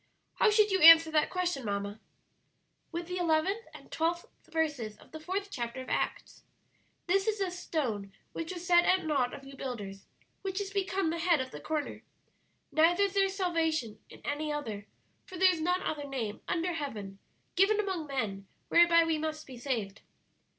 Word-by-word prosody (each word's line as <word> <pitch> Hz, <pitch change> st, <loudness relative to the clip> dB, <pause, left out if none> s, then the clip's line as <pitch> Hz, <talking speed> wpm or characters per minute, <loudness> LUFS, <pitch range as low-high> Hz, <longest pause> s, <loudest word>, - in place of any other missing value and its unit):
How 450 Hz, -, +5 dB
should 420 Hz, -1 st, +4 dB
you 380 Hz, -1 st, +2 dB
answer 325 Hz, 0 st, +9 dB
that 310 Hz, -1 st, +2 dB
question, 355 Hz, -7 st, -1 dB
mamma?" 200 Hz, 0 st, -3 dB, 0.9 s
"With 340 Hz, 0 st, -4 dB
the 360 Hz, +1 st, -4 dB
eleventh 355 Hz, +7 st, +1 dB
and -, -, -14 dB
twelfth 340 Hz, +1 st, -1 dB, 0.2 s
verses 285 Hz, -10 st, -2 dB
of -, -, -19 dB
the 315 Hz, -, -8 dB
fourth 390 Hz, +5 st, -4 dB
chapter 240 Hz, 0 st, -4 dB
of 260 Hz, -, -7 dB
Acts: -, -, -2 dB, 0.6 s
'This 390 Hz, +4 st, +2 dB
is 435 Hz, -1 st, +1 dB
the 385 Hz, -3 st, -1 dB
stone 250 Hz, -, -3 dB, 0.2 s
which 330 Hz, +1 st, -4 dB
was 355 Hz, -1 st, -7 dB
set 345 Hz, 0 st, +5 dB
at 370 Hz, 0 st, +2 dB
naught 275 Hz, -5 st, +1 dB
of 275 Hz, -, -9 dB
you 275 Hz, 0 st, -11 dB
builders, 205 Hz, -8 st, -6 dB, 0.3 s
which 385 Hz, 0 st, -3 dB
is 395 Hz, -1 st, -4 dB
become 390 Hz, -3 st, 0 dB
the 335 Hz, -, -3 dB
head 335 Hz, -2 st, +3 dB
of 260 Hz, 0 st, -4 dB
the -, -, -8 dB
corner. 310 Hz, -2 st, -3 dB, 0.7 s
Neither 345 Hz, +5 st, +4 dB
is 395 Hz, -1 st, 0 dB
there 390 Hz, -1 st, +3 dB
salvation 325 Hz, -, -1 dB
in -, -, -14 dB
any 300 Hz, +1 st, -2 dB
other; 220 Hz, -9 st, -5 dB, 0.4 s
for 370 Hz, -, -8 dB
there 370 Hz, +1 st, +5 dB
is 325 Hz, -, -4 dB
none 360 Hz, +3 st, +1 dB
other 290 Hz, -2 st, -3 dB
name 225 Hz, -6 st, -4 dB
under 350 Hz, +1 st, -1 dB
heaven 215 Hz, -11 st, -5 dB, 0.4 s
given 405 Hz, +3 st, +4 dB
among 380 Hz, -7 st, -2 dB
men, 210 Hz, -8 st, -3 dB, 0.2 s
whereby 340 Hz, -1 st, +6 dB
we 325 Hz, -1 st, 0 dB
must 310 Hz, 0 st, -4 dB
be 260 Hz, -, -10 dB
saved.' 225 Hz, -7 st, -3 dB
320 Hz, 180 wpm, -30 LUFS, 260-365 Hz, 0.9 s, answer